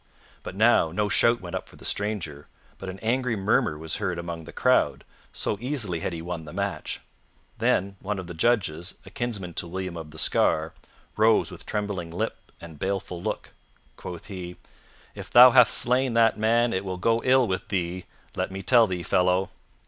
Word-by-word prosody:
But -, -, -8 dB
now 110 Hz, -5 st, +4 dB
no 105 Hz, +4 st, 0 dB
shout 115 Hz, +3 st, +3 dB
went 90 Hz, -2 st, -6 dB
up -, -, -5 dB
for -, -, -16 dB
the -, -, -12 dB
stranger, 90 Hz, -9 st, -3 dB, 0.3 s
but 95 Hz, -, -6 dB
an 95 Hz, -, -7 dB
angry 120 Hz, +1 st, 0 dB
murmur 95 Hz, -6 st, +1 dB
was 80 Hz, 0 st, -3 dB
heard 90 Hz, -2 st, -2 dB
among 85 Hz, -1 st, -6 dB
the -, -, -10 dB
crowd, -, -, +2 dB, 0.3 s
so 105 Hz, -, -2 dB
easily 120 Hz, -, -1 dB
had 80 Hz, -, -3 dB
he 85 Hz, -1 st, -6 dB
won 85 Hz, -2 st, -5 dB
the 75 Hz, -, -10 dB
match. -, -, -3 dB, 0.6 s
Then 100 Hz, +1 st, +1 dB
one 105 Hz, +1 st, -3 dB
of 95 Hz, -, -5 dB
the 85 Hz, -, -8 dB
judges, 90 Hz, -3 st, 0 dB
a -, -, -12 dB
kinsman 105 Hz, -8 st, -4 dB
to 85 Hz, -, -3 dB
William 90 Hz, 0 st, -5 dB
of 80 Hz, -2 st, -7 dB
the 80 Hz, -, -13 dB
Scar, 80 Hz, 0 st, +2 dB, 0.4 s
rose 110 Hz, +1 st, +3 dB
with -, -, -11 dB
trembling 100 Hz, -5 st, -3 dB
lip 85 Hz, -, -3 dB, 0.2 s
and 80 Hz, -3 st, -11 dB
baleful 95 Hz, -2 st, -3 dB
look. 110 Hz, -, -4 dB, 0.4 s
Quoth 85 Hz, -2 st, -8 dB
he, 90 Hz, -3 st, -7 dB, 0.6 s
"If -, -, -9 dB
thou 125 Hz, +1 st, +9 dB
hath 125 Hz, -1 st, +7 dB
slain 125 Hz, 0 st, +3 dB
that 115 Hz, -1 st, +4 dB
man 115 Hz, +2 st, +2 dB
it 95 Hz, -, -1 dB
will 95 Hz, -2 st, -4 dB
go 115 Hz, +5 st, +1 dB
ill 130 Hz, -1 st, +4 dB
with 95 Hz, 0 st, -3 dB
thee, 90 Hz, -2 st, -2 dB, 0.3 s
let -, -, -1 dB
me 95 Hz, 0 st, -7 dB
tell 115 Hz, +1 st, +5 dB
thee, 90 Hz, -2 st, -3 dB
fellow." 90 Hz, +3 st, +1 dB
95 Hz, 190 wpm, -26 LUFS, 85-115 Hz, 0.6 s, thou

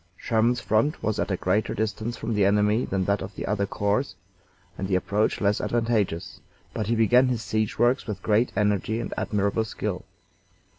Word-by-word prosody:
Sherman's 115 Hz, +2 st, +1 dB
front 115 Hz, +7 st, 0 dB
was 110 Hz, -, -1 dB
at -, -, -1 dB
a 95 Hz, -, 0 dB
greater 100 Hz, +5 st, 0 dB
distance 110 Hz, +2 st, -2 dB
from 115 Hz, -, -3 dB
the 105 Hz, -1 st, +2 dB
enemy 105 Hz, +3 st, +3 dB
than 95 Hz, -1 st, -1 dB
that 100 Hz, +1 st, +1 dB
of 95 Hz, +2 st, -6 dB
any -, -, -4 dB
other 100 Hz, 0 st, 0 dB
corps, 105 Hz, +7 st, -1 dB, 0.6 s
and 95 Hz, -, -4 dB
the 95 Hz, -, +1 dB
approach 100 Hz, +3 st, 0 dB
less 100 Hz, 0 st, +1 dB
advantageous, 115 Hz, -8 st, -1 dB, 0.3 s
but 105 Hz, -, -3 dB
he 115 Hz, -, +1 dB
began 120 Hz, +3 st, +4 dB
his 120 Hz, -3 st, -1 dB
siege 110 Hz, -1 st, -1 dB
works 120 Hz, +4 st, +2 dB
with 100 Hz, -3 st, -5 dB
great 110 Hz, +3 st, +2 dB
energy 105 Hz, +1 st, +1 dB
and 120 Hz, -, -4 dB
admirable 100 Hz, +1 st, 0 dB
skill. 110 Hz, -, -4 dB
105 Hz, 185 wpm, -25 LUFS, 100-115 Hz, 0.6 s, began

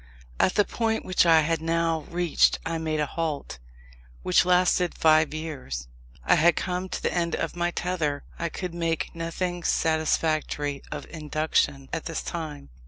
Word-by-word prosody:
At 185 Hz, -, +3 dB
the 205 Hz, -, +4 dB
point 225 Hz, -1 st, -1 dB
which 185 Hz, -1 st, +3 dB
I 165 Hz, -1 st, +7 dB
had 165 Hz, +1 st, 0 dB
now 165 Hz, -1 st, 0 dB
reached 175 Hz, -2 st, +3 dB
I 165 Hz, 0 st, -2 dB
made 155 Hz, -1 st, -1 dB
a 150 Hz, -, +2 dB
halt, 145 Hz, -, -4 dB, 0.6 s
which 90 Hz, -, +4 dB
lasted 180 Hz, 0 st, +3 dB
five 155 Hz, -1 st, +4 dB
years. 145 Hz, -, -5 dB, 0.4 s
I -, -, +5 dB
had 165 Hz, +1 st, +5 dB
come 180 Hz, +1 st, -2 dB
to -, -, -5 dB
the -, -, 0 dB
end 170 Hz, -2 st, 0 dB
of 165 Hz, -, -3 dB
my 175 Hz, 0 st, 0 dB
tether; 170 Hz, -5 st, -2 dB, 0.2 s
I 170 Hz, -, -1 dB
could 180 Hz, -1 st, -5 dB
make 165 Hz, -1 st, -2 dB
nothing 175 Hz, +1 st, -3 dB
satisfactory 155 Hz, -3 st, 0 dB
of 150 Hz, -1 st, -5 dB
Induction, 150 Hz, -3 st, 0 dB
at 165 Hz, -, -3 dB
this 165 Hz, -, -3 dB
time. 155 Hz, -, -6 dB
165 Hz, 165 wpm, -26 LUFS, 155-175 Hz, 0.6 s, I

